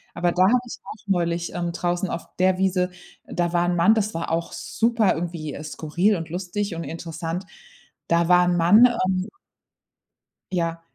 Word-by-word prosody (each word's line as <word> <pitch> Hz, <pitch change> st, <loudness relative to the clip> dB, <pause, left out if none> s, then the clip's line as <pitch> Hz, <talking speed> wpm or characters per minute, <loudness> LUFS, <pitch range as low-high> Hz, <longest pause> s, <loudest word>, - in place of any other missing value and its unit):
Aber 175 Hz, 0 st, +1 dB
da 180 Hz, +2 st, +3 dB
habe 235 Hz, +7 st, +5 dB
ich 240 Hz, -, -8 dB
auch 220 Hz, -, -11 dB
neulich, 170 Hz, -2 st, 0 dB
ähm, 175 Hz, -1 st, -2 dB
draußen 175 Hz, +2 st, -1 dB
auf 170 Hz, -, -4 dB
der 185 Hz, 0 st, +3 dB
Wiese 185 Hz, -1 st, +1 dB, 0.4 s
da 175 Hz, -1 st, -2 dB
war 175 Hz, 0 st, +2 dB
'n 175 Hz, -, +1 dB
Mann 175 Hz, +6 st, +5 dB
das 215 Hz, -1 st, 0 dB
war 165 Hz, 0 st, -3 dB
auch 165 Hz, +1 st, -1 dB
super 230 Hz, -3 st, +1 dB
irgendwie 165 Hz, -3 st, -4 dB
skurril 170 Hz, +7 st, 0 dB
und 165 Hz, -2 st, -5 dB
lustig 185 Hz, +2 st, -3 dB
und 165 Hz, -, -4 dB
interessant. 165 Hz, +2 st, -5 dB, 0.6 s
Da 170 Hz, 0 st, +2 dB
war 180 Hz, 0 st, +5 dB
'n 175 Hz, -, +2 dB
Mann, 205 Hz, +8 st, +7 dB
ähm 190 Hz, -5 st, -1 dB, 1.2 s
Ja. 170 Hz, -2 st, -1 dB
175 Hz, 170 wpm, -23 LUFS, 170-190 Hz, 1.2 s, Mann